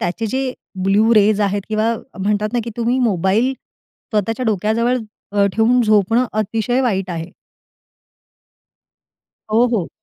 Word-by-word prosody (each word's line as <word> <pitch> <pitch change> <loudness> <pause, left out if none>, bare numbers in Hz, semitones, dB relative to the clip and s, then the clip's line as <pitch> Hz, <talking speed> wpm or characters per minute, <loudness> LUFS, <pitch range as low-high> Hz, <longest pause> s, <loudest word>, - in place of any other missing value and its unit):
त्याचे 185 +6 -2
जे 260 +3 -2 0.3
blue 210 +4 +3
rays 210 0 +4
आहेत 200 0 0
किंवा 220 +2 +1 0.3
म्हणतात 210 +2 0
ना, 240 - +1
की 235 - -5
तुम्ही 240 +2 0
मोबाईल 220 +2 +1 0.6
स्वतःच्या 225 +4 -1
डोक्याजवळ 220 +4 +1 0.3
अ, 200 -1 +3
ठेवून 235 +3 +3
झोपणं 215 +3 +3
अतिशय 220 +4 0
वाईट 195 -6 -1
आहे. 165 +1 -5 2.2
हो, 235 +3 +5
हो. 175 - -2
215 Hz, 125 wpm, -19 LUFS, 200-235 Hz, 2.2 s, हो